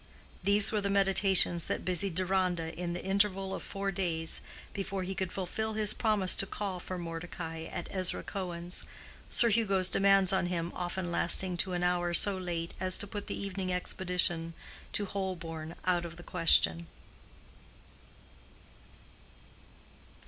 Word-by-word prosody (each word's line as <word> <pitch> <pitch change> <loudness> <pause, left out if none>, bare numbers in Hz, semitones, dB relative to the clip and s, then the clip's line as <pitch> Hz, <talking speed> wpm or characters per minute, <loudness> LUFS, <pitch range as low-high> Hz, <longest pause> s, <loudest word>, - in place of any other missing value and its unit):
These 200 +2 +5
were 210 -2 0
the 200 - -1
meditations 195 -3 +3
that - - -3
busied 185 0 0
Deronda 180 -3 0
in 170 +1 -4
the 175 - -6
interval 195 0 0
of - - -5
four 195 0 -4
days 170 -4 -1 0.3
before 195 -1 -4
he 190 +1 -4
could 185 0 -3
fulfill 220 +4 -3
his 215 -1 +3
promise 210 -5 +2
to 195 - -1
call 195 -3 -4
for 185 +1 -6
Mordecai 165 -1 -6
at 175 - -6
Ezra 185 -2 0
Cohen's, 180 -2 -5 0.5
Sir 235 - +5
Hugo's 200 -4 +2
demands 195 -1 +4
on 190 -2 +1
him 170 -1 -3
often 175 0 -4
lasting 180 +2 +3
to 185 +1 +1
an 175 0 -2
hour 175 -1 +1
so 200 +2 +7
late 170 -3 -4
as 185 0 +2
to - - -1
put 205 0 -6
the - - -4
evening 190 -1 -4
expedition 180 -2 -1 0.4
to 205 - +1
Holborn 170 -5 -5
out 180 -1 +1
of 165 - -11
the 175 - -11
question. 85 - +4
185 Hz, 150 wpm, -30 LUFS, 175-195 Hz, 0.5 s, so